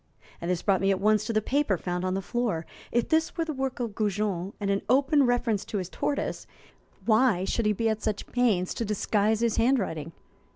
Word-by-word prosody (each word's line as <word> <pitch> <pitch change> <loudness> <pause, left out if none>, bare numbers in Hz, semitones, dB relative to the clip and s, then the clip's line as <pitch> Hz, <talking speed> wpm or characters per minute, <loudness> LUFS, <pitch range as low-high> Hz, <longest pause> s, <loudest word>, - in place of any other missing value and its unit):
This 175 0 -1
brought 195 -3 +2
me 195 - +2
at 195 -1 +2
once 215 +1 +3
to 230 - -2
the 215 -1 +1
paper 270 -8 +1
found 180 +1 -3
on 185 0 0
the 195 - -2
floor. 225 -8 -1 0.3
If 240 -1 +1
this 320 +2 +1
were 330 - 0
the 315 - -3
work 265 -1 -3
of 235 -4 -3
Goujon 200 -3 -1
and 200 -1 -1
an 195 - +1
open 275 +1 +4
reference 240 -4 +1
to 210 - -3
his 185 -2 -3
tortoise, 285 - -2 0.6
why 220 -5 +3
should 225 +2 0
he 210 - +3
be 225 +3 0
at 220 -1 0
such 215 -2 -2
pains 215 -8 +1
to - - -3
disguise 210 +1 +1
his 235 -2 +1
handwriting? 195 - +1
215 Hz, 210 wpm, -27 LUFS, 195-245 Hz, 0.6 s, open